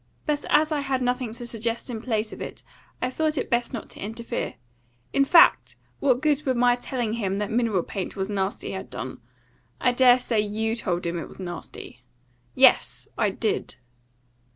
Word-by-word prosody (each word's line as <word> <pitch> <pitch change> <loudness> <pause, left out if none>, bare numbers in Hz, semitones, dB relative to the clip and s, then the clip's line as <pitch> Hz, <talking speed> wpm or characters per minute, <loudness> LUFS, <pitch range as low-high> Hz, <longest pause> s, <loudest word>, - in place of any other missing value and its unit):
But 295 -2 0
as 310 +1 +4
I 300 - +1
had 270 -2 -1
nothing 250 -1 -1
to 240 +1 -4
suggest 230 0 -2
in 230 -4 -5
place 220 -3 -1
of - - -9
it, - - -6 0.4
I 255 - 0
thought 310 +2 0
it - - -2
best 240 0 +1
not 235 - -5
to - - -10
interfere. 225 +3 -4 0.6
In 275 - +4
fact, 335 +5 +5 0.2
what 260 -2 +2
good 300 -1 +2
would 260 -2 0
my 245 0 +4
telling 245 -2 -3
him 200 -4 -1
that 210 0 -2
mineral 220 -6 +1
paint 190 -2 -5
was 190 -1 -2
nasty 195 -1 -2
have - - -6
done? - - -6 0.6
I 250 - +3
dare 245 0 +6
say 245 -3 -1
YOU 220 +2 -1
told 180 -7 -2
him 170 0 -2
it - - -6
was - - -14
nasty." 175 -8 -8 0.5
"Yes! - - +4
I - - +2
did." - - -2
235 Hz, 185 wpm, -25 LUFS, 210-255 Hz, 0.6 s, dare